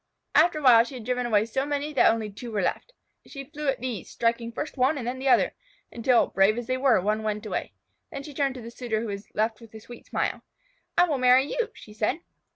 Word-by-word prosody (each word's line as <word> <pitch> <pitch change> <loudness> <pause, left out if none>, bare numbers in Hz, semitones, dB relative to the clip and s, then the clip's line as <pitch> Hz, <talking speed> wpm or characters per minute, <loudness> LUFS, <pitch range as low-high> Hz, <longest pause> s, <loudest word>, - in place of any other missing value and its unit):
After 325 +1 +4
a - - -4
while 235 -3 +8
she 240 +3 -9
had 235 -4 -8
driven 250 0 -1
away 215 -2 +3
so 265 +4 -1
many 290 +1 -3
that 270 - +5
only 220 -2 -3
two 235 +4 -8
were 205 -3 -1
left. - - -2 0.4
She 275 -2 -8
flew 300 +1 -7
at 270 -3 0
these, 245 -7 -4
striking 230 0 -1
first 295 +6 -5
one 270 +3 +2
and 250 - -5
then 250 +2 -3
the 270 - -3
other, 260 - +4 0.4
until, 235 +1 +3
brave 195 +3 +2
as 240 - -4
they 255 +2 -1
were, 255 -5 +4
one 210 +3 0
went 215 0 -3
away. - - -4 0.4
Then 275 - -6
she 295 - -9
turned 275 -1 0
to 250 - -7
the 230 - -8
suitor 235 -3 -3
who - - -4
was 200 0 -6
left 220 +1 0
with 225 -1 -14
a - - -8
sweet 240 +2 -13
smile. - - -2 0.6
"I 350 - +7
will 290 -5 -1
marry 255 +1 +5
you," 465 +10 -2
she 210 - -13
said. 220 +9 -1
245 Hz, 250 wpm, -26 LUFS, 220-270 Hz, 0.6 s, while